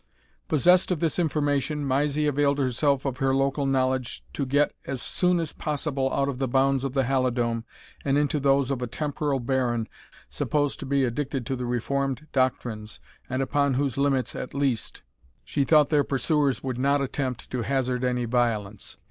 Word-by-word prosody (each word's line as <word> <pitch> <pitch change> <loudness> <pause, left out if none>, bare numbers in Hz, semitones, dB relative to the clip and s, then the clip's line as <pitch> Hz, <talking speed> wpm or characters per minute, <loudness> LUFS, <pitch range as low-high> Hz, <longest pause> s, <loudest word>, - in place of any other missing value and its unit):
Possessed 180 +5 +4
of 180 -4 0
this 165 +2 0
information, 145 -2 0
Mysie 145 +3 +1
availed 145 -1 +2
herself 140 +1 +1
of 130 -2 -2
her 135 -1 +1
local 135 +1 +1
knowledge 130 - 0
to 140 - -2
get 145 +3 +2
as 135 - -3
soon 180 +6 +1
as 165 -3 -3
possible 140 -3 -2
out 140 - +1
of 135 -2 -3
the 135 - 0
bounds 135 +1 +2
of 135 -1 -3
the 135 - +3
Halidome, 120 -3 0 0.4
and 140 0 +2
into 150 0 +1
those 140 -1 +2
of 130 -2 -2
a 125 - -2
temporal 145 +2 -2
baron, 120 -2 0 0.4
supposed 145 -2 -1
to 140 - -6
be 140 0 +2
addicted 130 +1 -2
to 135 - -2
the 125 -1 -4
reformed 135 +4 -1
doctrines, 120 -5 -1 0.3
and 130 +1 0
upon 140 0 +1
whose 135 -2 0
limits, 135 -2 0
at 125 - -6
least, 135 -5 -1 0.4
she 145 - 0
thought 150 +1 +5
their 150 -2 +3
pursuers 140 0 +1
would 130 -2 -3
not 140 +2 +3
attempt 135 -2 -3
to 125 - -1
hazard 130 -1 -1
any 125 -1 0
violence. 110 -4 -1
135 Hz, 175 wpm, -26 LUFS, 125-145 Hz, 0.4 s, thought